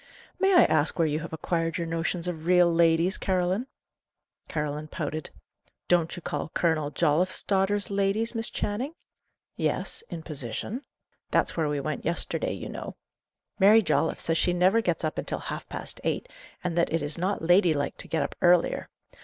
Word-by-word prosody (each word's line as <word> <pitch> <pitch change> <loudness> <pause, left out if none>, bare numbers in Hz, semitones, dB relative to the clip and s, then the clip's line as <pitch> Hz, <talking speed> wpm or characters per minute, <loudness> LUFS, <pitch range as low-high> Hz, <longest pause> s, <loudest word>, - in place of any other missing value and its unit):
"May 385 0 +4
I 350 - +8
ask 155 0 +1
where 165 - +3
you 150 0 -1
have 165 - -7
acquired 165 0 -1
your 170 - -2
notions 165 +1 -2
of 165 -2 -4
'real 180 -1 +5
ladies,' 165 +3 +3
Caroline?" 185 +5 0 0.8
Caroline 150 -1 -3
pouted. 155 -1 -4 0.6
"Don't 170 -1 +2
you 175 - -9
call - - -3
Colonel 160 -4 +1
Jolliffe's 170 +4 +1
daughters 200 +1 +1
ladies, 200 +4 +1
Miss 225 -1 -1
Channing?" 245 +10 -3 0.6
"Yes - - -1
in 165 - -6
position." 150 - -4 0.5
"That's - - +2
where 160 -3 0
we 145 -1 -1
went 150 0 -3
yesterday, 335 - -1
you - - -6
know. - - -7 0.6
Mary 210 +3 +7
Jolliffe 160 -3 +1
says 165 -1 +1
she 180 - +2
never 185 +6 +4
gets 175 -6 -1
up 155 - -1
until - - -3
half - - -6
past - - -5
eight, - - -1 0.4
and 180 -2 -2
that 170 - +2
it 165 -2 0
is 150 +3 -1
not 190 0 -1
lady 175 -1 +4
like 140 -1 -2
to - - -6
get 160 - 0
up - - -4
earlier. 175 -1 +3
170 Hz, 175 wpm, -27 LUFS, 160-190 Hz, 0.8 s, I